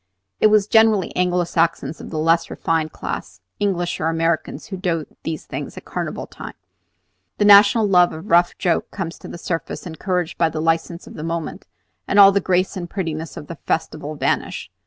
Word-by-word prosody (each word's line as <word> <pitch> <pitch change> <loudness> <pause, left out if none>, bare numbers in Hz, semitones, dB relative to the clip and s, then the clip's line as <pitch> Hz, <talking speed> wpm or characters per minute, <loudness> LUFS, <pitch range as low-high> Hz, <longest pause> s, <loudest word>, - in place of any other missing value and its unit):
It - - +6
is 210 -2 +4
generally 220 -3 +3
Anglo 180 0 +1
Saxons 165 -1 -1
of - - -9
the 160 - -5
less 165 +2 +2
refined 160 -1 -1
class, 95 - -6 0.2
English 180 -4 -1
or 160 - 0
Americans, 165 0 -1
who 200 -3 -6
do 170 -4 -1 0.2
these 160 -1 -5
things - - -6
at - - -9
Carnival - - -4
times. - - -10 0.8
The 205 - +2
national 205 +2 +7
love 180 -2 +5
of 160 +3 -8
a - - -12
rough 175 -1 +3
joke 175 -2 0
comes 170 -4 -6
to - - -10
the - - -8
surface, 165 +1 -4
encouraged 180 +1 -3
by 165 - +3
the 160 0 -5
license 165 +1 -1
of - - -12
the 150 - -7
moment, 165 -1 -4 0.4
and 200 - 0
all 195 -1 +10
the 200 0 +1
grace 185 +2 +1
and 175 -2 -5
prettiness 165 -4 -4
of - - -7
the 165 +1 -8
festival 155 -1 -2
vanish. - - -2
170 Hz, 195 wpm, -21 LUFS, 165-190 Hz, 0.8 s, all